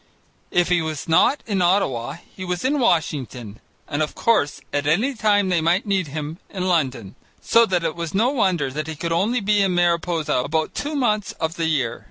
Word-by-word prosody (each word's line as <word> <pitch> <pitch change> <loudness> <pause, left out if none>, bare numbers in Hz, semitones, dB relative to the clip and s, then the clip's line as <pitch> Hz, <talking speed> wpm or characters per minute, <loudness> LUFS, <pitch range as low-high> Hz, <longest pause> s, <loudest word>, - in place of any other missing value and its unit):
If 175 0 +2
he 175 -2 +3
was 155 -2 -4
not 165 - +3
in 200 -4 -1
Ottawa, 150 -9 +1 0.2
he 185 - -7
was 180 +3 -3
in 285 +2 +1
Washington, 135 - -1 0.3
and 145 - -2
of 150 - -2
course 220 -11 +1
at 145 0 -1
any 215 - +2
time 205 -4 +2
they 175 -3 +2
might 175 +7 +2
need 195 -4 0
him 150 +3 -6
in 185 -2 -3
London, 130 - 0 0.3
so 230 0 +4
that 180 -2 0
it 160 -2 -1
was 170 -1 -4
no 230 +6 +3
wonder 180 - +1
that 150 +3 -4
he 160 - -5
could 165 +3 -4
only 215 +8 +1
be 205 0 +2
in 190 -2 +1
Mariposa 170 -2 +1
about 155 +5 -1
two 295 +1 -3
months 215 -7 0
of 160 -1 -3
the 165 -1 -2
year. 130 -7 -1
170 Hz, 205 wpm, -22 LUFS, 150-200 Hz, 0.3 s, so